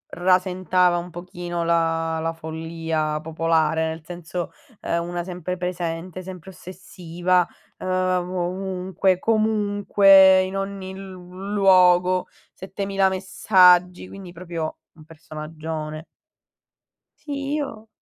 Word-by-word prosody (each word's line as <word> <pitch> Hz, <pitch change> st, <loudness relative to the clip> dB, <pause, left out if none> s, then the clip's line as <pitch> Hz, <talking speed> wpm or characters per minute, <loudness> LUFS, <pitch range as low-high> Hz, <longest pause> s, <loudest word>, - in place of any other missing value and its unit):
rasentava 180 Hz, 0 st, +2 dB
un 175 Hz, +1 st, -5 dB
pochino 175 Hz, 0 st, -5 dB
la 165 Hz, -1 st, +1 dB
la 165 Hz, +1 st, -1 dB
follia 160 Hz, -1 st, -3 dB
popolare, 160 Hz, 0 st, +1 dB
nel 160 Hz, 0 st, -7 dB
senso 175 Hz, 0 st, -6 dB, 0.3 s
è -, -, -2 dB
una 175 Hz, +1 st, -3 dB
sempre 180 Hz, 0 st, -5 dB
presente, 180 Hz, 0 st, -4 dB
sempre 185 Hz, 0 st, -9 dB
ossessiva, 180 Hz, -1 st, -2 dB, 0.3 s
ehm, 185 Hz, -1 st, 0 dB
ovunque, 185 Hz, 0 st, -1 dB
comunque, 205 Hz, -3 st, +5 dB
in 190 Hz, +1 st, -5 dB
ogni 195 Hz, -1 st, -5 dB
l 195 Hz, 0 st, -9 dB, 0.4 s
luogo, 185 Hz, -2 st, +4 dB, 0.3 s
7000 195 Hz, 0 st, -1 dB
messaggi, 185 Hz, -1 st, +3 dB
quindi 190 Hz, -3 st, -10 dB
proprio 170 Hz, -2 st, -5 dB, 0.2 s
un 160 Hz, -, -16 dB
personaggione. 155 Hz, 0 st, -7 dB, 1.1 s
Sì, 280 Hz, -1 st, -5 dB
io 225 Hz, -7 st, -5 dB
180 Hz, 100 wpm, -23 LUFS, 165-190 Hz, 1.1 s, comunque